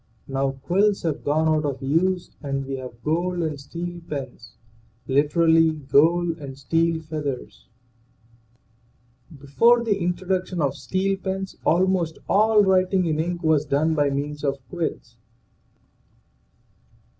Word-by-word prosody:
Now 135 0 -1
quills 200 +4 +2
have 155 -3 -2
gone 155 +2 +1
out 155 -1 +2
of 140 -3 -2
use 175 +6 0
and 135 -2 -3
we 135 0 -4
have 125 -2 -10
gold 175 +3 0
and 155 -3 -3
steel 175 +4 -6
pens, 130 -5 -7 0.5
literally, 160 +3 +3
gold 160 +4 +2
and 135 -2 -8
steel 165 +4 0
feathers. 140 - -6 1.7
Before 230 - +3
the 205 -4 0
introduction 180 +1 -2
of 140 -3 +1
steel 195 +4 -1
pens 190 0 -4
almost 175 -2 +2
all 215 +1 +4
writing 185 -1 +2
in 155 -2 -1
ink 175 +2 -2
was 155 -2 +3
done 155 +2 +1
by 145 -2 +2
means 145 +1 -4
of 140 -1 0
quills. 160 -9 -4
160 Hz, 125 wpm, -23 LUFS, 140-180 Hz, 1.7 s, all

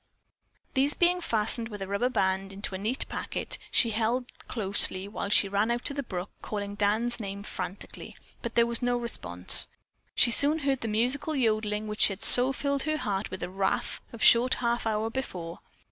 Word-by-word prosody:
These 275 +2 +1
being 355 +1 +2
fastened 225 -3 -1
with 205 -2 -8
a 195 - -6
rubber 200 +6 -1
band 195 -4 -1
into 200 0 -6
a 190 - -5
neat 220 +6 +1
packet, - - -3
she 230 - +2
held 235 +3 -2 0.2
closely 195 -3 +2
while 205 -1 -5
she 200 - +4
ran 200 +3 0
out 240 +1 -2
to 285 - +2
the 280 - -3
brook 190 -7 -6
calling 205 -1 -5
Dan's 215 +4 0
name 200 -1 -6
frantically, 200 -1 -7 0.3
but 235 - -6
there 235 - +4
was 235 +1 -3
no 245 0 0
response. 90 - +3 0.5
Soon 285 +6 +6
she 295 - -7
heard 270 -2 0
the 230 - -4
musical 250 +8 0
yodeling 215 -4 -1
which 210 0 +3
had 195 -2 -6
so 250 +2 +6
filled 280 +1 -2
her 310 +2 -1
heart 200 -6 -3
with 185 -1 -7
wrath 190 +2 -2
a 230 - -9
short 235 +3 +5
half 235 -1 -2
hour 220 +1 -1
before. 180 -10 -6
225 Hz, 185 wpm, -27 LUFS, 200-245 Hz, 0.5 s, Soon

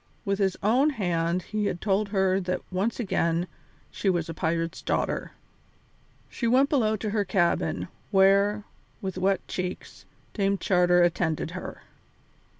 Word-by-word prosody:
With 200 0 0
his 190 -2 +1
own 250 +8 +4
hand 175 - -1
he 215 -1 -2
had 175 - -3
told 200 +1 0
her 190 -2 +2
that 180 -1 -2
once 200 +7 -1
again 170 -6 0 0.5
she 200 - -1
was 175 -2 0
a - - -3
pirate's 165 +1 -2
daughter. - - -2 0.9
She 235 - -3
went 260 +4 +4
below 220 -7 +2
to 215 0 -3
her 210 -1 +1
cabin, 185 -3 0 0.2
where, 200 +2 +4 0.4
with 190 -1 -4
wet 190 0 0
cheeks, 180 0 -5 0.3
Dame 200 -1 +1
Charter 180 -2 +3
attended 170 -2 0
her. - - -7
190 Hz, 145 wpm, -26 LUFS, 175-210 Hz, 0.9 s, own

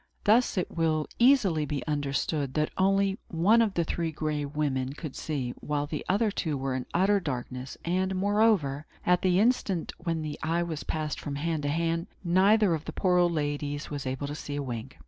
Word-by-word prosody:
Thus 225 +1 +3
it 180 - -2
will 160 -2 +1
easily 235 - +4
be 145 -1 -3
understood 145 -1 -1
that 150 0 +1
only 195 +2 +2
one 195 +8 +4
of 215 -4 +1
the 170 - +2
Three 165 0 -2
Gray 150 -1 -2
Women 140 -3 -1
could 150 -2 -7
see, 135 -6 -3
while 145 -1 -1
the 150 0 -4
other 210 +3 +2
two 160 -7 -2
were 135 0 -2
in 130 -1 -3
utter 195 +4 +3
darkness; 130 -4 -5
and, 185 +2 0
moreover, 195 -8 +2 0.2
at 180 0 +3
the 185 -1 +3
instant 205 -6 +1
when 165 -2 -2
the 150 -1 -5
eye 165 +2 0
was 160 -3 -4
passing 155 -1 -3
from 145 -2 -4
hand 160 +1 -1
to 145 - -1
hand, 165 +2 0 0.2
neither 195 +2 +4
of 155 -1 -3
the - - -6
poor 180 -2 +2
old 175 -1 +3
ladies 145 -1 -2
was 140 -2 -4
able 130 +2 -3
to 145 - -4
see 145 -1 -6
a 145 - -2
wink. 125 0 -6
160 Hz, 200 wpm, -28 LUFS, 145-185 Hz, 0.2 s, easily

